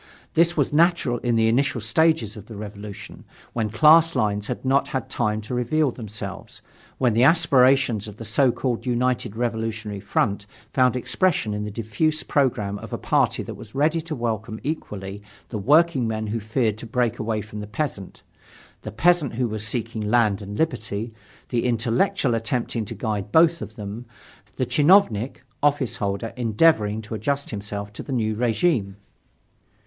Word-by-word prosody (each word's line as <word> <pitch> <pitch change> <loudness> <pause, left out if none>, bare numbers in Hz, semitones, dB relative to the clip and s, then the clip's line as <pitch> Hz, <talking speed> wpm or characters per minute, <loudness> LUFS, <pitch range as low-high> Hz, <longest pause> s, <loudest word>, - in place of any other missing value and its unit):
This 170 +1 +3
was 145 -1 +1
natural 165 -7 +3
in 120 -2 0
the 110 0 +3
initial 125 +2 +1
stage 160 +9 +2
of 105 -1 -11
the 115 - -9
Revolution, 105 0 -9 0.3
when 110 -2 -1
class 155 +8 +6
lines 105 -1 0
had 125 - -5
not 135 +2 +2
had 130 -3 -4
time 110 -2 0
to 110 +4 -7
reveal 130 +4 +1
themselves, 105 -4 -8 0.3
when 125 -3 +2
the 115 - +2
aspirations 135 - +4
of 105 -1 -10
the 115 - -7
so 125 +4 +3
called 125 0 -3
united 125 -2 0
revolutionary 110 -3 -3
front 100 +1 -1 0.3
found 125 -1 +3
expression 130 - 0
in 105 0 -3
the - - -4
diffuse 115 +9 -1
program 115 -8 0
of - - -10
a - - -2
party - - +1
that - - -7
was - - -12
ready 155 +4 +2
to 160 -1 -5
welcome 110 -2 -3
equally 100 -10 -5 0.3
the 110 - -4
workingman 125 - +2
who 110 +2 -2
feared 110 0 -1
to 115 - -8
break 120 0 0
away 110 0 -1
from 105 +1 -8
the 105 - -6
peasant; 105 -4 -5 0.6
the - - -7
peasant 155 - +2
who 125 0 0
was 110 -1 -3
seeking 115 -1 -3
land 105 -1 +2
and 100 +1 -7
liberty; 115 -7 -2 0.4
the 120 -2 0
intellectual 125 - +1
attempting 115 0 -2
to - - -7
guide 105 -3 -3
both 165 0 +4
of 110 - -7
them; 105 +3 -7 0.5
the - - 0
chinovnik 145 - +3 0.2
(officeholder) 115 -7 -1
endeavoring 110 -3 +2
to 105 - -8
adjust 140 +6 -2
himself 100 -1 -6
to - - -7
the - - -8
new 110 -4 0
regime. 115 - +1
115 Hz, 165 wpm, -23 LUFS, 105-135 Hz, 0.6 s, class